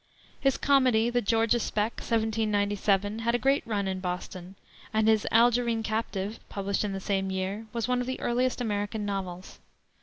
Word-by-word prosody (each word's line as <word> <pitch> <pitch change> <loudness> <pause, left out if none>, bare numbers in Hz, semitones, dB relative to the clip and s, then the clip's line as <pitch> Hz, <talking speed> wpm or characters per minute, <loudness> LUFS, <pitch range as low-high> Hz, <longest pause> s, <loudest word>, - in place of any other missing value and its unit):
His 270 -2 +2
comedy, 255 -5 +3
the 245 0 +1
Georgia 225 +2 +2
Spec, 215 0 -1
1797, 210 -2 0
had 235 +1 +1
a - - +3
great 270 +3 +2
run 205 -3 -1
in 190 0 -2
Boston, 180 0 -5 0.4
and 220 0 +2
his 220 -1 +3
Algerine 235 0 +3
Captive, 215 -1 -3
published 200 0 -2
in 205 -2 -2
the 195 - -3
same 195 -1 -1
year, 190 +4 -3
was 235 -1 -2
one 250 0 +1
of 250 - -4
the 260 - -3
earliest 250 +1 0
American 210 -2 -2
novels. 190 -2 -5
220 Hz, 170 wpm, -28 LUFS, 200-235 Hz, 0.4 s, comedy